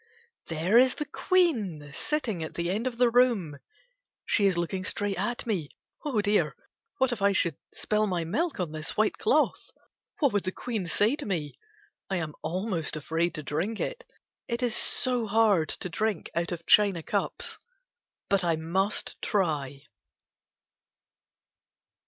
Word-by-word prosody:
There 170 +8 +3
is 255 0 +4
the 300 - -3
Queen 215 - +1
sitting 255 - -2
at 160 - -7
the 170 +1 -1
end 220 +6 -1
of 240 -2 -4
the 245 -1 +4
room. 225 - +2 0.7
She 205 -2 +3
is 185 -3 +1
looking 185 +2 -2
straight 200 0 0
at 240 +5 -2
me. 185 -11 -2 0.3
Oh 265 -9 0
dear! 205 0 +1 0.4
What 265 -2 +2
if 230 -4 -3
I 200 0 +4
should 170 -5 +3 0.2
spill 215 0 0
my 180 -3 -1
milk 295 - -1
on 175 -4 -2
this 155 0 -4
white 215 0 +1
cloth! 445 - +1 0.5
What 285 -7 +2
would 205 - +1
the 185 - -2
Queen 220 -4 -4
say 210 - +2
to - - -5
me! 155 -7 -3 0.5
I 190 - 0
am 160 -3 -3
almost 180 0 -2
afraid 160 +3 -1
to 150 - -4
diink 175 +10 -2
it. - - -3 0.4
It 235 +1 -2
is 240 -2 +1
so 250 -3 +1
hard 205 -7 +3
to - - -3
drink 210 +2 -2
out 170 +1 -1
of 170 -1 -5
china 200 -6 +4
cups. - - -2 0.7
But 200 -2 +2
I 170 -2 +2
must 185 +6 -1
try. 145 -9 -1
195 Hz, 160 wpm, -28 LUFS, 165-230 Hz, 0.7 s, is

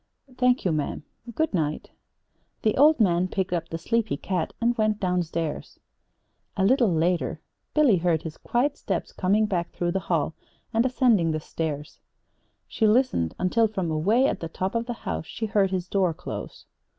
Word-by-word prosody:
"Thank 250 -2 +2
you, 180 - +3
ma'am. 150 -1 -2 0.3
Good 315 -5 0
night." 155 -4 -2 0.7
The 215 - +2
old 300 +2 +5
man 180 -4 +3
picked 185 -1 -2
up 165 -1 -2
the 165 - -3
sleepy 220 -1 0
cat 180 -1 -2
and 240 +1 +2
went 215 -2 +1
down 180 -1 +1
stairs. 165 -2 -4 0.8
A 190 - +2
little 240 -2 +4
later 170 +2 0 0.4
Billy 285 -10 +5
heard 165 -2 +1
his 160 -1 -7
quiet 270 +4 0
steps - - -3
coming 205 +3 +2
back 175 -5 -1
through 175 0 -2
the 190 - 0
hall 160 -3 +1 0.4
and 225 +1 +3
ascending 240 -9 +3
the 155 - -1
stairs. 150 -1 -5 0.7
She 220 - +1
listened 215 - +2
until 220 +5 +2
from 190 -6 -3
away 205 +12 +3
at - - 0
the 165 - -5
top 185 +3 -3
of 230 0 -1
the 240 - -2
house 80 -2 -3
she 225 - -4
heard 200 -2 +2
his 185 -1 -2
door 185 -4 +1
close. - - -7
185 Hz, 175 wpm, -25 LUFS, 165-230 Hz, 0.8 s, old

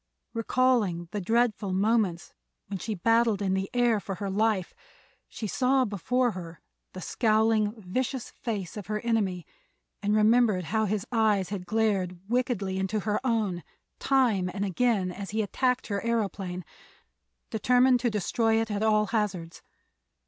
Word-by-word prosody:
Recalling 230 -7 +1
the 205 - -3
dreadful 215 -1 +1
moments 200 -3 +1 0.3
when 195 -1 -5
she 215 +4 -3
battled 225 +2 +2
in 195 -2 0
the 190 0 -1
air 240 -3 +2
for 195 -1 -5
her 195 +2 -4
life 210 -2 0 0.6
she 220 - -6
saw 255 +5 +2
before 245 +5 0
her 170 -4 -8 0.3
the 185 - -7
scowling, 220 0 +2
vicious 245 +6 -3
face 205 -7 -5
of 205 -4 -7
her 210 0 -2
enemy 200 -7 0 0.6
and 205 +1 +1
remembered 215 -3 +4
how 220 +6 0
his 205 -1 -1
eyes 215 -5 +2
had 190 -3 -5
glared 195 -5 0
wickedly 220 -6 -1
into 195 +3 -1
her 210 0 0
own 215 -8 0 0.4
time 235 -9 +2
and 200 0 -1
again 200 -1 +1
as 195 +2 -7
he 220 +1 0
attacked 250 +5 0
her 200 -2 -2
aëroplane, 195 -6 -2 0.9
determined 250 +3 +4
to 240 0 +1
destroy 225 +2 +1
it 225 -1 -2
at 205 0 -2
all 215 -1 +3
hazards. 195 -6 -2
210 Hz, 150 wpm, -27 LUFS, 190-230 Hz, 0.9 s, remembered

